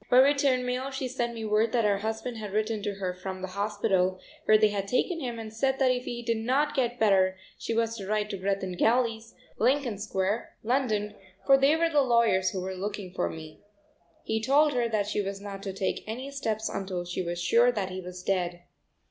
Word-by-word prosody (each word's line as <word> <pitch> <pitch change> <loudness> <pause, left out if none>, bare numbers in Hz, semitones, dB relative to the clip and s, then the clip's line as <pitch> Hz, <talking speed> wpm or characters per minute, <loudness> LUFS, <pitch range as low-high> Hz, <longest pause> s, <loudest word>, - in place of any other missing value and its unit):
By 250 - +5
return 270 -1 +4
mail 250 +2 -2
she 265 -1 -3
sent 240 -2 -2
me 225 -1 -5
word 215 +1 +2
that 235 -3 +2
her 200 -1 +2
husband 225 +3 -3
had 210 -3 -6
written 215 0 0
to 205 -1 -3
her 185 -2 -3
from 185 +1 -7
the 190 - -3
hospital, 195 -2 0 0.3
where 215 - +6
they 215 0 +4
had 200 -1 -3
taken 330 - 0
him, 245 -5 -4
and 220 -1 -7
said 265 +4 +1
that 265 -2 +3
if 250 0 -2
he 240 0 -5
did 230 -1 0
not 265 +6 +1
get 245 -3 0
better 190 -3 +3 0.2
she 230 - -3
was 230 0 0
to 195 -3 -7
write 210 0 0
to 200 - -3
Greth 195 +1 -1
and 185 -1 -3
Galley's, 230 -1 +1 0.2
Lincoln 250 -3 +1
Square, 195 +2 -2
London, 215 -4 0 0.3
for 275 - +7
they 275 +3 +4
were 330 0 +1
the 295 -2 +4
lawyers 235 -7 +3
who 190 - -4
were 190 +1 -4
looking 195 -1 -5
for - - -1
me. 155 -1 -9 0.6
He 220 0 -1
told 290 +5 +4
her 240 -2 +1
that 215 -2 0
she 210 0 -1
was 195 0 -4
not 200 -1 -7
to 195 - -4
take 190 0 -2
any 255 +5 -5
steps 220 -6 -2
until 190 -2 -3
she 175 +1 -3
was 175 -1 -3
sure 230 +8 +4
that 200 -5 -3
he 185 0 -5
was 180 0 -8
dead. 175 -2 -1
215 Hz, 225 wpm, -28 LUFS, 195-245 Hz, 0.6 s, for